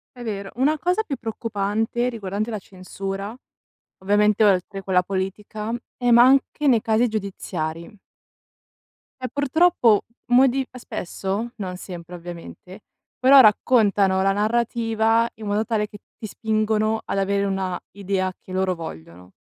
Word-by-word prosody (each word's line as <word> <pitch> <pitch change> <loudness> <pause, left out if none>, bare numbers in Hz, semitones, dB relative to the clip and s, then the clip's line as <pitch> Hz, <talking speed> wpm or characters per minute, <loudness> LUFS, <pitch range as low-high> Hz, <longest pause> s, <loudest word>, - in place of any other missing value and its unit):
È 245 - -9
vero, 200 -3 -4
una 290 +5 +2
cosa 360 +5 +1
più 280 -9 -4
preoccupante, 225 +1 -2
riguardante 210 -1 -4
la 215 - -3
censura, 195 +2 -6 0.6
ovviamente 210 +2 +2
oltre 195 0 +1
quella 180 -1 +2
politica, 205 +3 -4 0.2
è 245 -1 +1
ma 235 +1 +8
anche 275 +3 +3
nei 235 -5 +4
casi 225 +2 +2
giudiziari. 180 -4 -5 1.3
E 255 - -2
purtroppo 285 - +3 0.2
modi 260 +1 +4
spesso, 200 +1 -4
non 185 -3 -5
sempre 180 -1 -9
ovviamente, 175 +2 -10 0.4
però 265 +1 +8
raccontano 205 -4 +3
la 195 0 +3
narrativa 225 +1 +1
in 220 -1 -9
modo 210 +2 0
tale 215 -3 -1
che 205 - -11 0.2
ti 220 - -8
spingono 215 0 0
ad - - -3
avere 200 +1 +1
una 190 -2 -1 0.2
idea 190 -1 -1
che 185 - -11
loro 185 -1 0
vogliono. 90 - -10
210 Hz, 135 wpm, -23 LUFS, 190-235 Hz, 1.3 s, ma